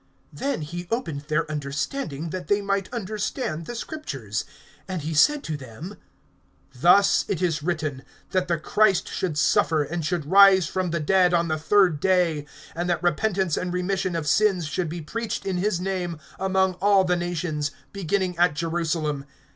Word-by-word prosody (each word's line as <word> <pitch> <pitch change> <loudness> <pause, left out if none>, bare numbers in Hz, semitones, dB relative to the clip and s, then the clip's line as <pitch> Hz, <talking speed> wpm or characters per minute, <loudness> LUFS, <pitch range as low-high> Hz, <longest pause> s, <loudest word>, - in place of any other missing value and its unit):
(45)Then 275 - -2
he 175 +3 -6
opened 195 - -2
their 155 0 0
understanding, 150 - -3
that 185 -3 -5
they 205 +3 +3
might 200 -1 -2
understand 210 - -3
the 240 - -5
Scriptures. 135 - -5 0.4
(46)And 185 -3 -3
he 160 +2 -3
said 280 - +4
to 155 - -3
them: 145 - -9 0.8
Thus 175 +9 +5
it 190 - -1
is 165 -4 0
written, 155 -5 -2 0.3
that 185 -1 +1
the 170 -1 +1
Christ 195 +4 +2
should 170 -6 -3
suffer, 155 +1 +3
and 165 +3 -4
should 165 -1 -1
rise 190 +1 +7
from 185 +3 -2
the 170 0 -1
dead 180 +3 +3
on 170 -1 +1
the 155 0 -1
third 180 -1 +3
day; 170 -4 +1 0.3
(47)and 175 +1 -2
that 175 0 -1
repentance 185 0 +1
and 180 - -2
remission 185 0 -1
of 165 -2 -2
sins 190 +2 +2
should 160 +2 -2
be 170 +1 -5
preached 230 +9 -4
in 190 -2 -1
his 185 -1 0
name 180 -3 -3 0.2
among 190 0 +2
all 200 -1 +5
the 180 -1 +1
nations, 170 -4 -2 0.2
beginning 190 -1 -1
at 175 -4 +4
Jerusalem. 160 -3 -1
175 Hz, 170 wpm, -24 LUFS, 155-190 Hz, 0.8 s, rise